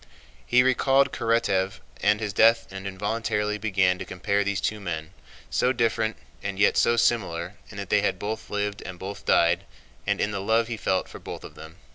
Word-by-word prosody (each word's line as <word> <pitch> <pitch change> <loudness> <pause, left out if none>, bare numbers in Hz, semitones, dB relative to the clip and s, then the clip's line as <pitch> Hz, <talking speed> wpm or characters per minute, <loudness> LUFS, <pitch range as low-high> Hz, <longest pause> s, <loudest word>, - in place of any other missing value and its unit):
He 125 +1 +5
recalled 135 +1 +3
Karatáev 100 -4 +1 0.3
and 105 +1 +3
his 105 -2 -3
death 115 +2 +5
and 95 0 -6
involuntarily 105 +1 -1
began 95 -3 +2
to - - -3
compare 100 +2 -1
these 100 -1 -1
two 110 - -1
men, 80 -3 -5 0.4
so 125 - +2
different, 115 -3 0 0.2
and 100 -1 -4
yet 100 - +4
so 120 0 +3
similar 100 -7 +1 0.2
in 100 - -11
that 100 -1 -6
they 105 - +4
had - - 0
both 110 +2 -5
lived 105 0 -2
and 90 -1 -8
both 95 +3 -7
died 85 +1 +3 0.4
and - - +1
in 105 - 0
the 100 -1 -3
love 115 +3 +2
he 115 - -2
felt 95 -3 0
for - - -10
both - - -8
of - - -10
them. 80 +1 -12
105 Hz, 195 wpm, -26 LUFS, 95-115 Hz, 0.4 s, He